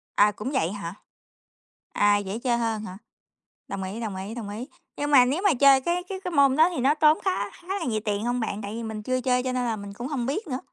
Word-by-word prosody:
À, 210 +1 +5
cũng 210 +6 -5
vậy 175 - 0
hả? 185 -4 -6 1.0
À, 205 0 +4
dễ 200 +2 -4
chơi 240 -1 0
hơn 225 -2 -1
hả? 185 -1 -8 0.7
Đồng 195 -1 -4
ý, 195 +5 -5
đồng 215 -4 -4
ý, 195 +5 -6
đồng 215 -4 -6
ý. 225 +6 -6 0.3
Nhưng 290 0 -2
mà 255 -3 +8
nếu 290 +9 0
mà 400 - +5
chơi 270 0 +6
cái 350 +4 -1
cái 380 -1 -4
cái 360 - -3
môn 280 -3 +4
đó 320 +3 +5
thì 335 - -4
nó 270 +4 +4
tốn 305 0 +5
khá 375 - 0
khá 350 - -18
là - - -4
nhiều 220 -3 0
tiền 210 +2 -1
hông 245 +1 0
bạn, 215 -2 -3
tại 205 +1 -6
vì 230 - -5
mình 220 -1 -5
chưa 255 +1 -1
chơi 250 -1 +1
cho 255 - -1
nên 250 -1 -1
là 225 -2 0
mình 200 -1 -8
cũng 240 +5 -6
hông 265 -5 -2
biết 325 - -2
nữa? 255 -1 -3
245 Hz, 270 wpm, -25 LUFS, 210-280 Hz, 1.0 s, mà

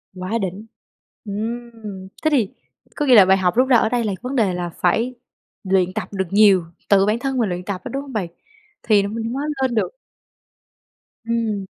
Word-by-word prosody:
Quá 185 +1 -6
đỉnh. 195 +3 -4 0.6
Ừm, 220 -2 -6 0.2
thế 310 - +4
thì 240 -9 +2 0.5
có 295 - -1
nghĩa 255 -3 +6
là 200 -4 +9
bài 190 +1 +5
học 180 -2 +1
rút 255 +2 +4
ra 255 -2 +6
ở 220 - +2
đây 240 0 0
là 210 -3 -1
vấn 255 +3 -4
đề 210 -7 +2
là 175 -1 -3
phải 220 +9 0 0.5
luyện 185 -2 +1
tập 200 -3 -3
được 190 -1 -1
nhiều, 200 -4 +5 0.2
tự 195 -1 +5
bản 215 +3 +1
thân 270 +1 -2
mình 225 -5 +1
luyện 180 0 -4
tập 195 -1 -4
á, - - -6
đúng 275 - -2
hông 280 -2 -10
bạn? 205 -6 -1 0.6
Thì 210 -3 +4
mình 225 +2 -4
mới 280 +3 -2 0.2
lên 255 -2 +1
được. 220 - 0 1.3
Ừm. 225 -4 -1
215 Hz, 200 wpm, -21 LUFS, 190-235 Hz, 1.3 s, là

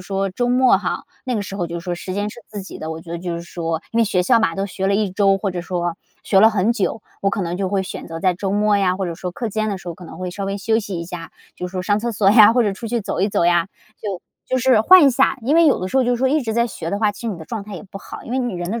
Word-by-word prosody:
说 195 +1 -1
周 245 +6 -1
末 250 +1 +5
哈， - - -3 0.2
那 255 -3 -2
个 205 - -1
时 195 - -7
候 175 -3 -2
就 170 +1 -4
是 170 - -11
说 180 - -2
时 185 +2 -6
间 205 +2 -1
是 235 - -10
自 210 -2 -6
己 195 - -9
的， 160 - -6
我 160 0 -5
觉 165 +1 -9
得 170 - -3
就 175 -1 -3
是 170 - -6
说， 165 -1 -3
因 230 - 0
为 230 - +5
学 190 -4 +1
校 235 +3 +4
嘛， 165 -7 0
都 195 +1 -1
学 190 -1 -2
了 200 - +2
一 205 -3 0
周， 195 0 +3
或 195 -1 -2
者 175 - -3
说 175 -1 -2 0.3
学 195 - +4
了 220 +2 +7
很 210 +1 +2
久， 225 0 -1 0.2
我 195 - +1
可 200 - -2
能 175 -1 -2
就 190 0 -1
会 195 0 0
选 - - -7
择 165 0 -5
在 185 +1 +2
周 190 +2 -3
末 205 +1 +3
呀， 185 -2 +2
或 190 -1 -2
者 170 - -4
说 180 +1 -5
课 230 +6 -4
间 215 +1 -1
的 200 -2 -2
时 - - -16
候， 170 - -4
可 180 - -12
能 160 - -10
会 185 0 -4
稍 200 +2 -4
微 195 +1 -3
休 220 +3 +1
息 200 -4 -5
一 170 - -4
下， 170 -1 -8 0.2
就 180 - -5
是 - - -14
说 185 0 -3
上 205 +2 +1
厕 235 +2 -1
所 205 -3 +3
呀， 215 -1 +8
或 245 0 +3
者 205 - +1
出 225 +4 -7
去 240 +1 0
走 200 - -3
一 195 - +2
走 185 - +1
呀， 175 +1 +3 0.3
就 195 -4 -4 0.3
就 260 - 0
是 255 -3 +4
换 370 +8 +8
一 275 - +6
下。 270 +2 +2
因 270 +7 +1
为 335 0 +6
有 285 - +4
的 185 - -3
时 260 - -2
候 - - +4
就 245 - +1
是 245 - +2
说 260 +2 +1
一 305 +3 +2
直 230 -5 -3
在 235 +1 +2
学 175 -7 -6
的 200 - -1
话， 210 -1 +2
其 200 - -13
实 - - -4
你 205 - -3
的 160 - -9
状 220 +3 -5
态 205 0 -9
也 - - -7
不 195 -1 -10
好， - - -10
因 235 - -7
为 260 - +1
你 245 -5 -2
人 175 0 -4
的 230 +2 -2
200 Hz, 375 characters per minute, -20 LUFS, 180-225 Hz, 0.3 s, 呀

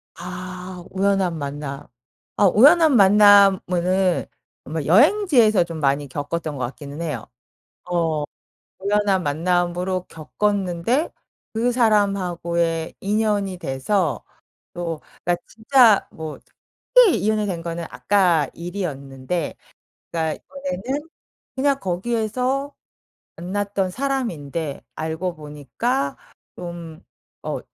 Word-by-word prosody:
아, 180 0 -7
우연한 190 -3 +1
만남. 140 -1 -6 0.5
어 - - +3
우연한 295 - +6
만남은 195 -3 +5 0.4
아마 155 +1 -3
여행지에서 240 - +5
좀 165 -2 -7
많이 140 0 +1
겪었던 145 +2 -4
것 125 - -1
같기는 145 +4 -9
해요. 150 -9 -4 0.6
어 165 -4 0 0.6
우연한 200 -1 +1
만남으로 175 +4 0
겪었는데 200 - -1 0.4
그 235 +2 +1
사람하고의 180 -7 +1
인연이 205 -2 0
돼서 160 +3 -1 0.5
또 170 -3 -4 0.3
나 175 - +2
진짜 225 -1 +4
뭐 160 -1 -7 0.6
특히 485 -8 +7
인연이 215 0 +1
된 180 -4 -3
거는 170 0 -4
아까 180 -7 +2
일이었는데 160 -4 -4 0.6
그러니까 160 -2 -2
이번에는 280 - -4 0.5
그냥 275 +1 +2
거기에서 240 +8 -1 0.6
만났던 195 +2 -2
사람인데 170 - -3
알고 160 +3 -3
보니까 150 - -3 0.4
좀 170 -1 -8 0.4
어 - - -3
180 Hz, 225 characters per minute, -22 LUFS, 165-210 Hz, 0.6 s, 특히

